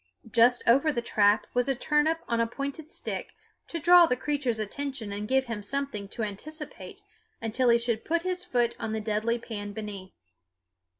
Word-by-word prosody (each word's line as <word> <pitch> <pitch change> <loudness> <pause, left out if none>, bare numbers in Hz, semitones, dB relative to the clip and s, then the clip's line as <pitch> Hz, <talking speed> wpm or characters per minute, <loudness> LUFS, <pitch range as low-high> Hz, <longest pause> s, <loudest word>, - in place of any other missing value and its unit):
Just 240 +2 +4
over 275 +6 +4
the 255 - -1
trap 205 -2 +3
was 245 +2 +1
a 270 - +2
turnip 300 +4 +1
on 235 -1 0
a 230 - +2
pointed 280 +5 -5
stick - - -5 0.3
to 335 - -4
draw 345 +2 +7
the 250 - +1
creature's 270 -3 -1
attention 235 +1 -4
and 205 +1 -4
give 265 +2 +2
him 230 -4 -4
something 240 -2 -2
to 220 +3 -5
anticipate 310 - -7 0.4
until 235 +3 +1
he 235 - +6
should 235 -1 -1
put 335 +1 0
his 365 0 -2
foot 240 -5 +1
on 225 -1 -3
the 220 - -1
deadly 215 +2 0
pan 205 -3 -6
beneath. 200 -3 -7
240 Hz, 180 wpm, -28 LUFS, 220-290 Hz, 0.4 s, draw